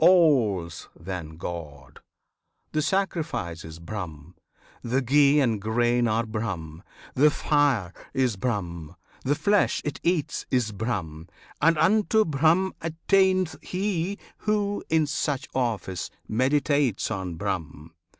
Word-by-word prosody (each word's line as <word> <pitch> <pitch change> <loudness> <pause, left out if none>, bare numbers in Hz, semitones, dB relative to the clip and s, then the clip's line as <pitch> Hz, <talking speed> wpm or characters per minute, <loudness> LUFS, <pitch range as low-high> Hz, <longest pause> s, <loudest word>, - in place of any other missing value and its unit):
All's 125 - +3
then 85 -3 -6
God! 75 -6 -7 0.7
The 155 - +1
sacrifice 160 - -1
is 80 0 -9
Brahm, 85 -4 -7 0.5
the 130 +3 0
ghee 140 +3 +5
and 115 -7 +1
grain 120 +2 +2
Are 115 +1 +1
Brahm, 95 -8 -4 0.3
the 150 +4 +5
fire 145 - +1 0.2
is 130 -4 +1
Brahm, 90 -7 -3 0.3
the 145 +3 +1
flesh 205 +6 +2
it 150 -2 -3
eats 170 -4 -1
Is 125 -4 +1
Brahm, 95 -7 -4 0.3
and 165 0 +4
unto 215 +6 +3
Brahm 165 +6 +2
attaineth 185 +2 +2
he 190 0 -2 0.2
Who, 205 -1 -1
in 160 -1 +3
such 145 -2 -2
office, 110 -8 -2 0.2
meditates 135 -1 +1
on 95 -4 -3
Brahm. 80 -4 -4
125 Hz, 115 wpm, -26 LUFS, -, 0.7 s, ghee